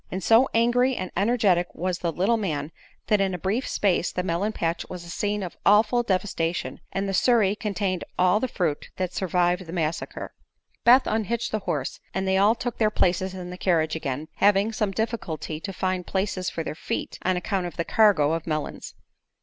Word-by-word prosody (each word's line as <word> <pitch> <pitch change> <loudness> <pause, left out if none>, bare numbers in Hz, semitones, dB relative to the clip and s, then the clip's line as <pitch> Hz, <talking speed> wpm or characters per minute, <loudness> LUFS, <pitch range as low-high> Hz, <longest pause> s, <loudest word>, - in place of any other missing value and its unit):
And 190 0 -4
so 230 +7 +5
angry 245 +3 +3
and 185 - -4
energetic 200 -4 +2
was 180 +1 -2
the 170 - -1
little 195 +8 +2
man 160 -8 -2 0.3
that 210 -2 +2
in 190 -2 0
a - - -3
brief 200 +9 -1
space 185 -3 +1
the 180 - -2
melon 185 +4 0
patch 170 -4 -2
was 180 -1 -7
a 170 - -8
scene 205 +2 -1
of 180 - -6
awful 220 +4 +4
devastation, 185 -5 -1
and 195 +1 -2
the 195 - -2
surrey 210 -1 +3
contained 200 -4 -2
all 185 +3 +4
the 260 - -1
fruit 165 -10 -2
that 185 -1 -2
survived 180 -1 0
the - - -7
massacre. 165 -2 -3 0.5
Beth 250 +3 +7
unhitched 225 +2 -1
the 215 - 0
horse - - -2 0.2
and 190 0 -1
they 190 - +2
all 210 +3 +5
took 240 0 -4
their 215 -2 +4
places 190 -1 0
in 180 -1 -7
the 180 - -8
carriage 160 -4 +1
again, 145 -1 -3
having 205 +2 +4
some 210 -1 0
difficulty 195 -8 -3
to 195 +4 -5
find 185 -1 -2
places 190 -2 -1
for 165 - -4
their - - -4
feet 155 - -4
on 185 0 +1
account 180 0 -1
of 175 - -10
the 170 - -1
cargo 195 -10 +4
of 165 0 -3
melons. 155 -2 -4
190 Hz, 200 wpm, -25 LUFS, 175-210 Hz, 0.5 s, Beth